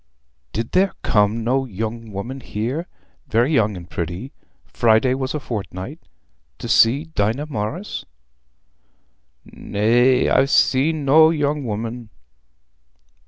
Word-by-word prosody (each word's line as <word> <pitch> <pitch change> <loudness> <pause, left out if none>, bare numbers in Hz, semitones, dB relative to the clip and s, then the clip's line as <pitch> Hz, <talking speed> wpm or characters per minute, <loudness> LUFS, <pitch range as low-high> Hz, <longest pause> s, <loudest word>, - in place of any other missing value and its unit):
"Did 115 +2 -4
there 190 +1 +2
come 105 +1 +2
no 130 +3 +1
young 110 +1 -5
woman 115 +7 -5
here—very 125 - -3
young 105 -7 +2
and 85 -1 -10
pretty—Friday 110 - -1
was 130 +2 -3
a - - -1
fortnight, 110 - -6 0.6
to - - -7
see 125 +6 +4
Dinah 110 +7 0
Morris?" 150 - -4 1.4
"Nay; 120 +5 +2
I'n 135 - +3
seen 145 +2 +2
no 155 +3 +6
young 150 -3 -1
woman." 115 +1 -5
120 Hz, 105 wpm, -21 LUFS, 110-140 Hz, 1.4 s, no